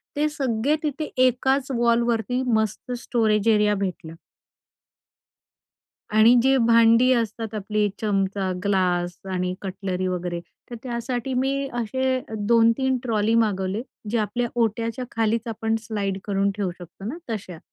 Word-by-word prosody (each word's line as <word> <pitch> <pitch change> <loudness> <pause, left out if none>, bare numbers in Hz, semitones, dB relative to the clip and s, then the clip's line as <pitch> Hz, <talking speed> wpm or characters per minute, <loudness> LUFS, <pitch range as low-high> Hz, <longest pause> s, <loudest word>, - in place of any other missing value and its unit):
ते 300 +1 +1
सगळे 270 -1 0
तिथे 305 +1 -2 0.2
एकाच 265 +2 0
वॉलवरती 235 +1 +1
मस्त 220 +3 -1
स्टोरेज 220 -3 +1
एरिया 210 -1 +3
भेटला. 185 -5 -4 2.0
आणि 225 +3 +7
जी 270 +1 +4
भांडी 230 +2 +5
असतात 225 -2 -1
आपली, 210 0 0
चमचा, 195 -2 0
ग्लास 180 -3 +1
आणि 180 0 -1
कटलरी 185 -1 -3
वगैरे 175 -1 -3 0.3
तर 240 - -5
त्यासाठी 245 +1 -3
मी 275 +2 0
असे 260 +3 0 0.3
2-3 235 +3 +3
ट्रॉली 225 -2 +1
मागवले, 205 -2 +1 0.3
जे 235 - +1
आपल्या 220 +3 -1 0.2
ओट्याच्या 230 +3 -1
खालीच 225 +1 0
आपण 225 0 -1
स्लाईड 200 -3 -2
करून 200 -1 +1
ठेवू 200 -3 -1
शकतो 180 +2 -12
ना, 290 - -4
तशा. 190 -6 -5
225 Hz, 125 wpm, -24 LUFS, 200-245 Hz, 2.0 s, आणि